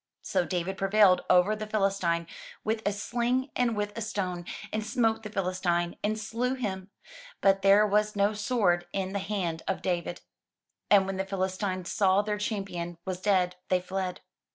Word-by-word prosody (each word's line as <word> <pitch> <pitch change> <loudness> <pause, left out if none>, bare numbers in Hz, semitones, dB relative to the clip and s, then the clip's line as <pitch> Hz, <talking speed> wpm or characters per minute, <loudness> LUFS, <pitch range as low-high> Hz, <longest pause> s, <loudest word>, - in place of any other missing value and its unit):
So 275 - 0
David 185 +1 -2
prevailed 195 -1 +5
over 180 +4 +5
the 215 0 -5
Philistine 195 -5 +1 0.4
with 220 +1 -1
a - - +3
sling 245 +5 -1
and 235 -3 +1
with 205 0 -2
a 230 - -4
stone, 185 -5 -3 0.3
and 215 0 -1
smote 225 0 +1
the 215 - -7
Philistine, 180 -3 -1
and 215 +1 0
slew 235 +4 -1
him; 195 -6 -4 0.5
but 195 0 +3
there 200 +2 +6
was 210 +1 +1
no 200 +1 +2
sword 205 -5 +1
in 190 0 -2
the 200 - -1
hand 185 -5 -2
of - - -2
David. 175 -1 -2 0.7
And 200 -2 +6
when 195 0 -3
the 190 - -1
Philistines 185 -1 -2
saw 195 0 +3
their 210 0 -2
champion 195 -5 -3
was 185 -1 -4
dead, 185 -3 +2
they 185 - +3
fled. 185 0 -4
195 Hz, 170 wpm, -28 LUFS, 185-215 Hz, 0.7 s, there